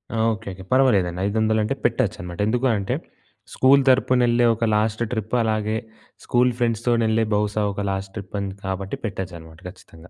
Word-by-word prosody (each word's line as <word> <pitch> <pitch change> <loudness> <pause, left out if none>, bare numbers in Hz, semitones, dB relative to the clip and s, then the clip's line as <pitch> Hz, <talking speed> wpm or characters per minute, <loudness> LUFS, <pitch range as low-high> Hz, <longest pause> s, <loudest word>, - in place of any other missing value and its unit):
ఆ! - - -1 0.2
ఓకెకె. 100 -4 -8
పర్వాలేదండి. 100 -10 +3
500 110 +1 +1
అంటే 110 +6 -1
పెట్టొచ్చు 115 -2 +1
అన్నమాట. 90 +1 -8
ఎందుకు 120 +4 0
అంటే 100 -1 -2 0.6
స్కూల్ 135 +2 +5
తరపున 130 -1 +3
వెళ్ళే 120 0 +3
ఒక 115 - -5
లాస్ట్ 110 +1 0
ట్రిప్ 110 0 -2
అలాగే 110 0 0 0.5
స్కూల్ 125 +1 +3
ఫ్రెండ్స్‌ 115 -2 0
తోని 115 -1 +3
వెళ్ళే 110 +1 +2
బహుశా 105 +1 0
ఒక 100 0 -3
లాస్ట్ 95 0 -5
ట్రిప్ 100 0 -8
అని 100 -1 -3
కాబట్టి 95 0 -4
పెట్టొచ్చు 95 -4 -5
అన్నమాట 80 0 -14
ఖచ్చితంగా. 85 -2 -16
110 Hz, 170 wpm, -22 LUFS, 95-120 Hz, 0.6 s, స్కూల్